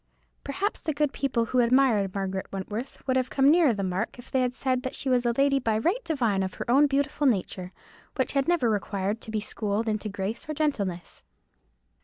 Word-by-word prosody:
Perhaps 385 +9 -2
the 310 -3 -2
good 295 -1 +1
people 250 -4 0
who 255 +2 0
admired 235 -6 +3
Margaret 190 -1 -3
Wentworth 210 +7 -5
would 260 -1 +1
have 255 -1 +1
come 275 +1 +4
nearer 325 -4 +5
the 200 -3 -2
mark 190 +6 -2
if 245 - -13
they 260 - +2
had 250 0 0
said 255 -2 0
that 260 +1 -4
she 270 - -3
was 250 -1 +2
a - - +3
lady 275 0 +3
by 225 -4 0
right 365 - 0
divine 235 - 0
of 190 -1 -3
her - - -5
own 285 +4 +6
beautiful 285 +1 +1
nature, 185 -5 -1 0.4
which 260 -3 0
had 275 0 0
never 345 -8 +2
required 205 0 -1
to - - -10
be 220 -1 -1
schooled 210 +1 -2
into 215 0 -1
grace 200 +7 -4
or 305 - -2
gentleness. 200 - -2
245 Hz, 210 wpm, -27 LUFS, 205-275 Hz, 0.4 s, own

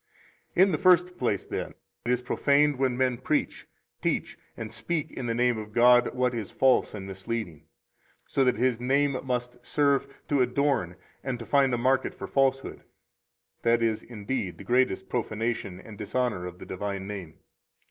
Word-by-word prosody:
41 185 - +7
In - - 0
the 155 - +1
first 180 0 +4
place, 105 -6 0
then, - - -5 0.3
it 120 - +1
is 125 0 0
profaned 140 +2 +2
when 130 -2 +1
men 130 -2 +1
preach, 150 +4 -1 0.3
teach, - - -1 0.2
and - - -6
speak 170 -4 -2
in 125 - -5
the 115 - 0
name 120 -1 +2
of 105 0 -9
God 120 +1 +5
what 125 0 +1
is 115 -4 -4
false 130 -4 +2
and 95 -2 -6
misleading, 95 -4 -5 0.6
so 135 - +1
that 125 -3 +2
His 125 0 +1
name 140 +3 +2
must 125 -1 -3
serve 140 -1 +2 0.2
to 145 -2 +2
adorn 125 -8 +1 0.3
and 130 -2 -2
to 115 - -8
find 140 -2 +3
a 120 - +1
market 130 +2 +1
for - - -6
falsehood. 135 -1 0 0.8
That 115 0 +3
is, 110 -1 +1
indeed, 110 -3 -4
the - - -10
greatest 120 -6 +1
profanation 110 -5 -2
and 105 +1 -12
dishonor 110 -4 -1
of 90 0 -9
the - - -10
divine 95 0 -4
name. 95 -6 -7
125 Hz, 175 wpm, -27 LUFS, 110-135 Hz, 0.8 s, 41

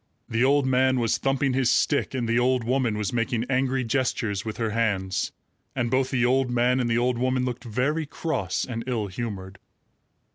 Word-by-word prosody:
The 115 +1 0
old 140 +1 +3
man 130 0 +3
was 115 -2 +1
thumping 135 0 +1
his 130 -2 +2
stick, 140 -2 +1
and 120 -3 -1
the 115 +2 +2
old 125 0 +2
woman 120 -2 0
was 105 0 -2
making 115 0 0
angry 130 0 +1
gestures 115 -5 -1
with 110 -1 -5
her 115 -2 -1
hands; 100 -4 0 0.4
and 120 -3 -1
both 130 0 +2
the 125 -2 +1
old 130 +1 +2
man 125 +1 +2
and 120 -2 0
the 115 - +2
old 120 0 +1
woman 130 0 +1
looked 125 0 -4
very 140 +7 -1
cross 140 - -2
and 115 -2 -5
ill 115 -5 -1
humored. 95 -2 -6
125 Hz, 190 wpm, -25 LUFS, 115-130 Hz, 0.4 s, old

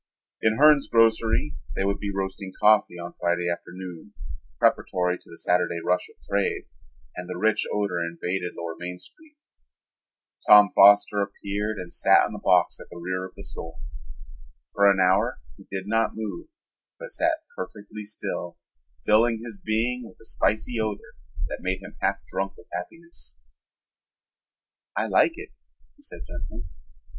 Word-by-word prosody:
In 110 0 +2
Hern's 150 -1 +6
Grocery 115 +4 +3 0.2
they - - 0
would 100 0 0
be 100 - -3
roasting 95 0 -4
coffee 105 -4 +4
on 85 0 -7
Friday 85 0 +1
afternoon, 90 +2 -6 0.4
preparatory 90 0 +1
to - - -21
the 85 - -12
Saturday 90 -1 +1
rush 90 0 +1
of - - -20
trade, 100 0 0 0.5
and 90 0 -7
the 90 - -4
rich 110 +3 +1
odor 100 -4 0
invaded 90 +2 -3
lower 85 -1 -4
Main 90 +1 -5
Street. 305 - -18 1.1
Tom 105 -2 +9
Foster 100 +1 +6
appeared 100 +1 -3
and 90 -2 -7
sat - - +5
on - - -6
a - - -6
box - - +3
at - - -11
the - - -10
rear 90 +2 -3
of 90 - -22
the - - -10
store. 80 0 -8 1.0
For 100 0 +5
an 100 - +4
hour 95 +6 +3 0.2
he - - -17
did 95 -1 -4
not 115 +1 +1
move 110 - -5 0.5
but - - -9
sat 320 -1 0
perfectly 105 - -7
still, 100 -4 -5 0.5
filling 115 +1 +3
his 115 -4 -8
being 115 +3 -1
with - - -16
the - - -18
spicy 110 +2 0
odor 110 -2 -3 0.3
that - - -6
made 95 +1 -2
him 105 +2 -11
half 100 0 0
drunk 95 0 -4
with - - -15
happiness. 165 - -8 1.6
"I - - +1
like 335 - +3
it," 385 +3 -9 0.5
he 290 - -24
said 290 - -10
gently. 85 0 -7
100 Hz, 155 wpm, -25 LUFS, 90-110 Hz, 1.6 s, Tom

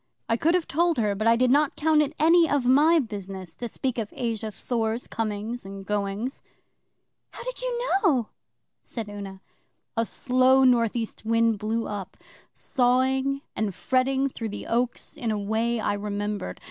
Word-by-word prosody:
'I 230 - +2
could 330 +7 +2
have 355 -3 0
told 340 +2 +1
her, 210 -3 +1
but 215 +3 -1
I 230 - +6
did 250 +1 +3
not 290 +1 +3
count 310 0 +3
it 300 +1 -1
any 330 +2 +5
of 285 -3 +1
my 295 +7 +5
business 195 - -5
to 240 - -3
speak 255 +1 -2
of 215 -2 -4
Asa 225 -2 -2
Thor's 225 +1 -2
comings 220 +2 -3
and 195 0 -8
goings. 205 +5 -2 0.9
'How - - -10
did - - -5
you - - -2 0.2
know?' 265 - +2 0.5
said 225 -3 -6
Una. 200 -2 -8 0.5
'A 230 0 +1
slow 260 +1 +3
North 240 -3 +4
East 225 -3 -4
wind 230 -1 +2
blew 225 +2 -1
up, 205 -3 -6 0.3
sawing 265 +1 +1
and 205 -4 -2
fretting 265 +3 +1
through 230 -4 -5
the 205 - -6
oaks 240 +1 -2
in 235 - -2
a 215 - 0
way 220 +3 0
I 205 - 0
remembered. 205 - -3
230 Hz, 170 wpm, -26 LUFS, 210-265 Hz, 0.9 s, I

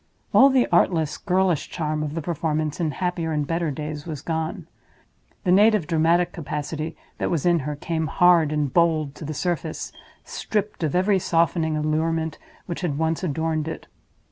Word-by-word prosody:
All 275 - +8
the 260 -2 +3
artless, 165 -3 +2
girlish 185 -4 +1
charm 155 -2 -2
of 150 0 -3
the 165 - -3
performance 155 -2 -2
in 165 -3 +1
happier 170 +1 -2
and 150 -2 0
better 165 +2 -1
days 150 +2 -5
was 150 -4 -6
gone. 160 -1 -3 0.8
The 180 - +2
native 210 -1 +5
dramatic 170 +2 +2
capacity 155 0 -4 0.2
that - - 0
was 165 -3 -1
in 175 -1 +4
her 150 +1 -4
came, 160 +2 -2
hard 170 -3 +4
and 150 -3 -1
bold, 160 -4 +2
to 155 - -9
the 155 +1 -4
surface, 170 -2 -3 0.3
stripped 210 -2 -3
of 155 -2 -1
every 190 +2 +3
softening 165 -2 +1
allurement 160 +1 -1 0.3
which 170 0 -5
had 160 -6 -1
once 160 +2 0
adorned 160 -1 -1
it. 160 - -6
160 Hz, 170 wpm, -24 LUFS, 155-175 Hz, 0.8 s, All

